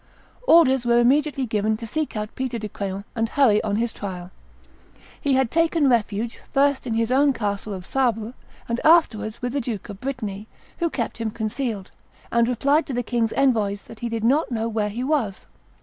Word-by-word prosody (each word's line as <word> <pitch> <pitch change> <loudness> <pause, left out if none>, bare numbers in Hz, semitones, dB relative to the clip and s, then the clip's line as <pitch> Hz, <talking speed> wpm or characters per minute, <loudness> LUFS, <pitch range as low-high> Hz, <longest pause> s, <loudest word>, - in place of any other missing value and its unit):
Orders 265 - +6
were 240 0 +3
immediately 270 +2 +3
given 215 -1 0
to 230 - -7
seek 300 +1 -3
out 210 0 -4
Peter 260 -2 -3
de 215 -1 -5
Craon, 200 0 -5
and 225 -1 0
hurry 235 -7 +3
on 205 -2 -1
his 230 +1 -1
trial. 180 -3 -6 0.9
He 280 - +1
had 260 -3 +2
taken 330 -2 +2
refuge, 230 -2 0
first 280 -2 +2
in 225 - -1
his 230 +1 0
own 280 +2 +4
castle 205 -2 -3
of 185 -3 -6
Sable, 235 -3 0 0.3
and 235 +1 -2
afterwards 235 -10 +3
with 245 0 -2
the 280 - 0
Duke 225 -5 -5
of 200 -1 -9
Brittany, 220 -6 -4 0.3
who 340 -1 +1
kept 235 -7 -3
him 225 -1 -1
concealed, 220 -2 -3 0.4
and 235 0 +3
replied 280 +6 +2
to 275 - -4
the 245 0 -1
king's 230 -1 0
envoys 215 -7 +1
that 225 - -13
he 235 - -3
did 230 -1 -3
not 275 +7 +3
know 225 -2 -1
where 215 -2 -1
he 235 +5 -4
was. 260 -9 -1
235 Hz, 195 wpm, -23 LUFS, 215-265 Hz, 0.9 s, Orders